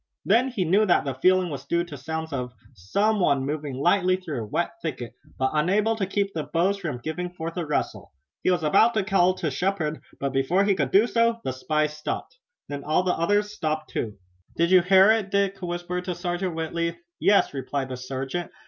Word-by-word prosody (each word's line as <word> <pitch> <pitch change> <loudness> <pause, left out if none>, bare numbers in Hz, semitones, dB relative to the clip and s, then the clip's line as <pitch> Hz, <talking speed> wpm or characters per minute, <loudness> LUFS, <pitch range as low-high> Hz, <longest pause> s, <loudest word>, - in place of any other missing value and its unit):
Then 230 +6 +4
he 220 -8 -2
knew 200 +6 +3
that 175 - +3
the 135 - -2
feeling 185 +6 +2
was 140 -1 -7
due 170 +2 +1
to 170 -4 -9
sounds 160 +3 -5
as 135 - -1
of 125 0 -6 0.2
someone 140 - +1
moving 145 -1 -3
lightly 180 +6 +3
through 165 -9 -5
a 110 - -6
wet 170 +10 -1
thicket, 130 -7 -5 0.2
but 130 0 0
unable 200 +8 +2
to 200 -4 -2
keep 200 0 -1
the 160 - -2
boughs 170 +7 +1
from 155 -9 -4
giving 160 +7 -4
forth 165 -1 -6
a 175 - -2
rustle. 150 - -2 0.3
He - - +1
was 180 -3 +1
about 220 +10 +4
to 215 - +2
call 185 -2 +3
to 155 -5 -2
Shepard, 160 -1 -1 0.2
but 140 -1 -2
before 150 +9 +2
he 200 0 +3
could 190 - 0
do 205 +3 +5
so 230 -1 +1
the 130 - -2
spy 155 +4 0
stopped. 150 - -5 0.3
Then 145 -1 -6
all 155 +4 +1
the 185 - +1
others 205 +4 +1
stopped 155 -5 -3
also. 110 -3 -2 0.4
"Did 170 +1 +2
you 185 -1 +7
hear 190 +3 +6
it?" 220 -3 +1
Dick 200 -1 0
whispered 175 0 -4
to 180 -1 -3
Sergeant 175 0 -3
Whitley. 170 +1 -2 0.2
"Yes," 200 -6 +3
replied 135 0 -3
the 130 - -5
sergeant. 135 +6 -4
175 Hz, 210 wpm, -25 LUFS, 150-195 Hz, 0.4 s, you